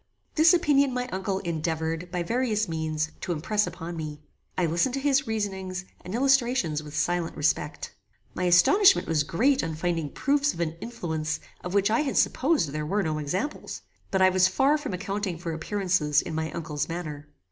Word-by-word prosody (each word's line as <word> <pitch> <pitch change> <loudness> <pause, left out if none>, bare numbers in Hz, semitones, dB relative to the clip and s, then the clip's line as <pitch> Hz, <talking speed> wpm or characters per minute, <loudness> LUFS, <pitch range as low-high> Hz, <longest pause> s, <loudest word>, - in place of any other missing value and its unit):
This 320 +1 +6
opinion 285 -6 +3
my 250 0 -1
uncle 190 -1 -2
endeavoured, 160 +1 -2
by 180 -2 -1
various 220 0 0
means, 155 -1 -2
to - - -3
impress 205 +6 0
upon 175 -1 -6
me. 155 -2 -5 0.4
I 180 - +2
listened 170 - +1
to - - -1
his 275 0 +2
reasonings 190 -4 -3 0.2
and 180 +4 -5
illustrations 245 - +2
with 150 -1 -8
silent 175 -1 -1
respect. 150 0 -1 0.4
My 180 - -2
astonishment 370 - +5
was 160 -2 +2
great 260 - +2
on 160 - -3
finding 165 -2 -1
proofs 285 - +1
of - - -10
an 165 -2 -1
influence 160 -9 -3 0.2
of 180 +2 -4
which 200 +1 +3
I 225 - +3
had 290 -3 -1
supposed 280 - +2
there 150 +2 -3
were 195 +7 0
no 155 -2 -1
examples; 185 - -4 0.3
but 190 -1 +2
I 185 - +7
was 185 0 +4
far 270 +10 +3
from 295 -10 -3
accounting 195 -1 -3
for 165 -1 -4
appearances 170 -3 +1
in - - -6
my 160 0 -2
uncle's 155 -3 -3
manner. 155 -4 -5
180 Hz, 180 wpm, -26 LUFS, 160-235 Hz, 0.4 s, I